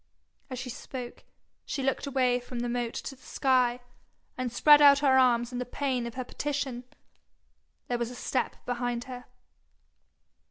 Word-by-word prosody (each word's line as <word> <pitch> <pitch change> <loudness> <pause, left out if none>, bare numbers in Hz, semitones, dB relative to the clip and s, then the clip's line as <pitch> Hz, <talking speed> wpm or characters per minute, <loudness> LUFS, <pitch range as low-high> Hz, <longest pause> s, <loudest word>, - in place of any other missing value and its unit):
As 255 - -5
she 250 0 -5
spoke, 250 0 -8 0.4
she 275 - -4
looked 270 +1 -1
away 255 -2 +2
from 245 0 -6
the 240 - -2
moat 240 -1 -2
to 270 - -5
the 260 - -25
sky, 250 -3 +1 0.5
and 255 -2 -3
spread 295 +4 +7
out 285 -1 +8
her 265 -1 +5
arms 240 -1 +3
in 245 - -4
the - - -1
pain 250 -1 -2
of 235 - -8
her 255 - -3
petition. 275 -3 -3 1.0
There 245 -1 -1
was 235 -1 -1
a 250 - -9
step 255 +1 -2
behind 245 -1 -2
her. 250 -1 -9
250 Hz, 165 wpm, -28 LUFS, 245-265 Hz, 1.0 s, out